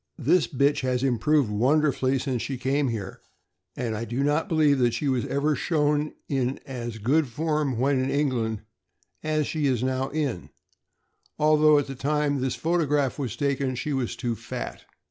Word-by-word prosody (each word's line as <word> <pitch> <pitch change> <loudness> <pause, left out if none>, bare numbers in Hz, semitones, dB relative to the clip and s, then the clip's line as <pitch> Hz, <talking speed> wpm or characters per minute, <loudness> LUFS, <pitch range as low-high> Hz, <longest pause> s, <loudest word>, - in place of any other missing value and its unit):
This 165 +4 +3
bitch 140 +2 +2
has 130 -1 -1
improved 135 0 +2
wonderfully 135 +3 +2
since 130 -3 -2
she 135 - -3
came 135 +3 0
here, 105 -5 -5 0.5
and 115 -3 -2
I 110 - -3
do 120 +4 -2
not 145 +3 +1
believe 150 -4 +3
that 120 -2 +2
she 145 - -2
was 130 -3 0
ever 145 +2 +1
shown 150 -1 0
in 135 -1 -1
as 120 -4 -5
good 140 +8 +2
form 150 0 -1
when 130 +1 +2
in 130 - -1
England 125 -7 0 0.6
as 155 -1 0
she 150 -1 -1
is 125 -3 0
now 130 +1 -1
in, 140 - -3 0.9
although 155 0 +5
at 145 - +1
the 135 - -6
time 145 +1 0
this 130 -1 -1
photograph 150 -5 0
was 125 -6 -3
taken 140 0 -1
she 145 +4 -3
was 130 -4 -2
too 120 -2 -2
fat. 115 +2 -7
135 Hz, 170 wpm, -26 LUFS, 125-150 Hz, 0.9 s, although